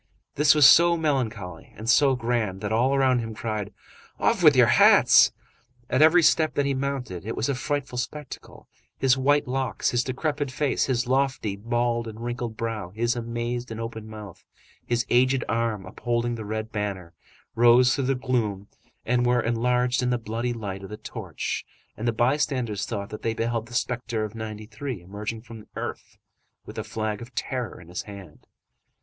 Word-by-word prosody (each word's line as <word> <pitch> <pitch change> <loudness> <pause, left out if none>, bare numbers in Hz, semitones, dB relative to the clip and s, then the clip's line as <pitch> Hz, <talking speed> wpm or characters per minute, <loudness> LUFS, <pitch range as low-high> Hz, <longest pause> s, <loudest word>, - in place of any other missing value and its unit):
This 150 +2 +4
was 150 -3 +8
so 170 +2 +6
melancholy 115 - -3
and 110 - -8
so 135 +3 +5
grand 115 -6 -1
that 105 0 -3
all 125 +5 +2
around 130 -2 +3
him 115 -2 -5
cried: 105 -2 -4 0.5
"Off - - +2
with - - +7
your - - +7
hats!" - - +6 0.6
At 130 - +2
every 165 +3 +6
step 155 0 +3
that 145 - +1
he 140 - +1
mounted, 130 -9 -3
it 110 +3 -4
was 115 - -1
a - - +2
frightful 135 -1 -3
spectacle; 140 +3 -7 0.3
his 135 -1 +3
white 145 +2 +2
locks, 130 -5 -1
his 120 0 +1
decrepit 145 +2 -2
face, 135 +1 0
his 130 -1 0
lofty, 130 -5 0
bald, 120 +2 -1
and 110 0 -8
wrinkled 120 -1 -4
brow, 115 -5 -3
his 115 +5 -1
amazed 120 +1 -3
and 110 0 -6
open 115 -1 -6
mouth, 105 -4 -10 0.4
his 120 0 0
aged 130 +1 +3
arm 115 -4 -1
upholding 120 +4 -2
the 110 -2 -6
red 110 +1 -4
banner, 100 -5 -4 0.4
rose 120 +2 +5
through 135 -2 -1
the 135 +1 +1
gloom 115 -6 -2 0.4
and 120 +1 +2
were 125 0 +3
enlarged 125 +2 +1
in 125 - 0
the 125 - +1
bloody 115 +2 -3
light 100 -5 -5
of 95 - -9
the 105 - -7
torch, 110 - -5 0.3
and 115 - -4
the - - +3
bystanders 120 -3 0
thought 100 -3 -4
that 105 - -8
they 115 0 -1
beheld 115 0 -2
the 120 - -9
spectre 120 -3 -1
of 105 -1 -5
'93 110 +2 -6
emerging 105 +5 -6
from 115 -2 -10
the 105 - -15
earth, - - -6 0.5
with - - -10
the - - -2
flag 110 -1 -3
of 120 +1 -11
terror 125 -3 -3
in 90 - -14
his 90 +1 -4
hand. 100 -6 -12
120 Hz, 180 wpm, -25 LUFS, 110-130 Hz, 0.6 s, was